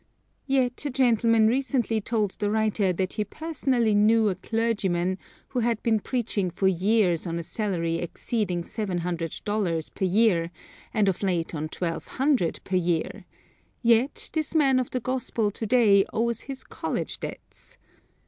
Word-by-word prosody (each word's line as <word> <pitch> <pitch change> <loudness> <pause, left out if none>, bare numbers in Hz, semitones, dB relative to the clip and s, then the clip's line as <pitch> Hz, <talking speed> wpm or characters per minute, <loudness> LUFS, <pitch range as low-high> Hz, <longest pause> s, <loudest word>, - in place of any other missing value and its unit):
Yet 260 -2 +1
a 290 - -1
gentleman 230 -4 +3
recently 240 -2 +1
told 210 -2 0
the 205 +1 -2
writer 215 -2 +1
that 185 +1 -2
he 210 - -1
personally 260 -5 0
knew 215 +1 +4
a 190 - -1
clergyman 195 -6 -1 0.3
who 255 - -2
had 230 -2 0
been 225 -2 +2
preaching 210 -5 -1
for 190 +3 0
years 190 -1 +2
on 165 0 -2
a 170 - -3
salary 170 -4 -2
exceeding 175 +1 -2
seven 195 -1 -3
hundred 165 -2 -3
dollars 185 -7 -1
per 190 - -2
year, 185 -3 +3 0.4
and 215 -3 +2
of 190 - 0
late 180 -4 -1
on 155 0 -3
twelve 165 -1 -4
hundred 265 - +1
per 185 - 0
year; 170 -2 -1 0.6
yet, 235 +4 +2
this 315 0 0
man 270 -4 +4
of 255 - -2
the 255 - -2
gospel 240 -4 -1
to 220 +2 -5
day 210 -4 +5
owes 235 0 0
his 270 -1 -6
college - - -4
debts. - - -9
215 Hz, 160 wpm, -26 LUFS, 185-235 Hz, 0.6 s, day